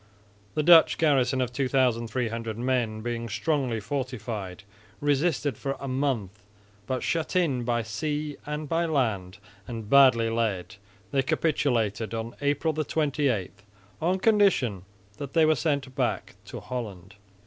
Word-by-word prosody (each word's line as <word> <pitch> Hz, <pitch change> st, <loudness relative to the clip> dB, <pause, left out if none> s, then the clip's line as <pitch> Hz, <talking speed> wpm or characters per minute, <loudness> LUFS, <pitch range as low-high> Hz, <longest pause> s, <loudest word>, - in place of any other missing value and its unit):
The 155 Hz, -, +1 dB
Dutch 165 Hz, 0 st, +7 dB
garrison 135 Hz, -4 st, +2 dB
of 125 Hz, -1 st, -2 dB
2300 120 Hz, -4 st, 0 dB
men, 120 Hz, -3 st, -1 dB
being 115 Hz, 0 st, -3 dB
strongly 120 Hz, +1 st, 0 dB
fortified, 110 Hz, -5 st, -4 dB, 0.4 s
resisted 145 Hz, 0 st, 0 dB
for 135 Hz, 0 st, -3 dB
a 140 Hz, -, -6 dB
month 125 Hz, -8 st, -2 dB, 0.5 s
but, 130 Hz, -1 st, -2 dB
shut 165 Hz, +2 st, -1 dB
in 155 Hz, -9 st, +2 dB
by 120 Hz, -1 st, 0 dB
sea 150 Hz, +6 st, -3 dB
and 150 Hz, 0 st, -4 dB
by 165 Hz, +3 st, +1 dB
land 110 Hz, -, -1 dB, 0.3 s
and 115 Hz, -3 st, -6 dB
badly 130 Hz, -5 st, +6 dB
led, 100 Hz, -5 st, -2 dB, 0.3 s
they 140 Hz, -1 st, +2 dB
capitulated 120 Hz, -8 st, 0 dB
on 115 Hz, +1 st, -5 dB
April 145 Hz, +3 st, +1 dB
28, 145 Hz, -, 0 dB, 0.5 s
on 180 Hz, +4 st, +2 dB
condition 190 Hz, -, +2 dB, 0.3 s
that 140 Hz, +3 st, -7 dB
they 165 Hz, -2 st, +5 dB
were 155 Hz, -, +5 dB
sent 140 Hz, -5 st, -1 dB
back -, -, -1 dB
to -, -, -7 dB
Holland. 100 Hz, -7 st, -6 dB
130 Hz, 130 wpm, -27 LUFS, 115-150 Hz, 0.5 s, Dutch